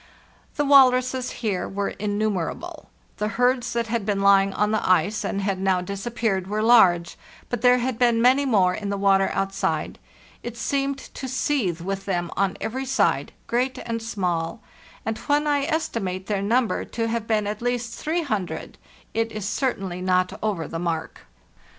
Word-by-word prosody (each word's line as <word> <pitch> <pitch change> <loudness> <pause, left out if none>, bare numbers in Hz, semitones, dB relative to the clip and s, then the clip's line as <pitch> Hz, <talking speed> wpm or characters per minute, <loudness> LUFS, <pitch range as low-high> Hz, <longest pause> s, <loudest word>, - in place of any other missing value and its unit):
The 290 - 0
walruses 255 -2 +5
here 205 -6 -2
were 200 +1 -2
innumerable. 205 -3 -3 0.3
The 210 - -1
herds 245 0 +2
that 235 0 0
had 230 -1 -2
been 200 -1 -1
lying 195 0 +5
on 210 +2 0
the 215 - 0
ice 190 +4 +2
and 200 - -2
had 195 -1 -1
now 190 -1 +2
disappeared 200 0 -2
were 210 +2 -1
large; 185 -8 +4 0.3
but 245 -3 -3
there 250 0 +6
had 250 -1 -2
been 240 -2 +4
many 255 +4 +4
more 195 -9 +3
in 200 +2 -4
the 200 - -1
water 195 -1 +3
outside. 195 0 -2 0.4
It 240 -1 -7
seemed 275 +3 -1
to 275 -1 -8
seethe 245 - -1
with 195 +2 -4
them 175 -3 -2
on 195 -1 0
every 260 +4 -3
side, 265 +1 +1
great 250 +2 0
and 230 -1 -3
small; 185 -2 -2 0.4
and 220 0 -2
when 290 +1 +1
I 290 -2 +1
estimate 230 - -2
their 200 -2 -1
number 230 +3 +1
to 230 0 -3
have 225 -1 -2
been 215 -2 +1
at 210 +1 -4
least 245 -1 -2
300, 295 - -3 0.3
it 225 0 0
is 210 -2 -4
certainly 195 -7 -2
not 185 0 +1
over 200 -7 -1
the 165 - -5
mark. 165 -2 -4
215 Hz, 170 wpm, -24 LUFS, 195-245 Hz, 0.4 s, there